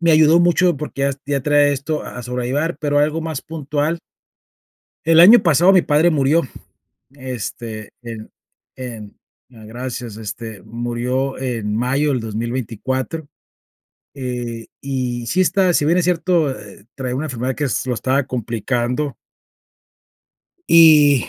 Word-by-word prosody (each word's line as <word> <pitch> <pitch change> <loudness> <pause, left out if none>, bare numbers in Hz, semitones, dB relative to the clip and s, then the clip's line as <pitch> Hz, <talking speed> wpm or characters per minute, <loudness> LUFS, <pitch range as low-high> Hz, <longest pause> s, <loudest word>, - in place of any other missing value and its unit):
me 170 -1 +3
ayudó 155 +1 +6
mucho, 175 -1 +3
porque 145 -1 -5
yas 140 0 -1
ya 140 -1 -1
traía 145 +1 +3
esto 145 +2 -2
a - - -8
a - - -6
sobrellevar, 130 +6 -2
pero 145 -1 +1
algo 150 +2 +1
más 160 -3 -4
puntual 155 +1 -2 1.1
el 165 +1 +5
año 210 +8 +9
pasado 175 +1 +5
mi 185 -2 +5
padre 155 +3 +3
murió, 150 +2 +2 0.7
este, 120 -5 -7
en 115 -2 -8 0.5
en 115 -5 -8 0.3
ah, 110 -2 -14
gracias. 120 0 -6
Este, 110 -1 -7
murió 120 +4 -3
en 115 -5 -3
mayo 135 +5 +1
del 130 -3 0
2024, 120 +6 -4 0.9
eh, 120 -4 -5 0.2
y 125 -3 -3
sí 185 - 0
está 185 0 +3
si 150 - +2
bien 170 - +3
es 180 - +1
cierto, 175 -3 +1
eh, 100 -1 -13
traía 130 -2 -4
una 150 +4 -2
enfermedad 130 -1 -3
que 150 - -2
es 130 -1 -2
lo 125 - 0
estaba 130 +4 0
complicando 125 +3 -2 1.5
y 150 -5 +6
135 Hz, 140 wpm, -19 LUFS, 120-155 Hz, 1.5 s, año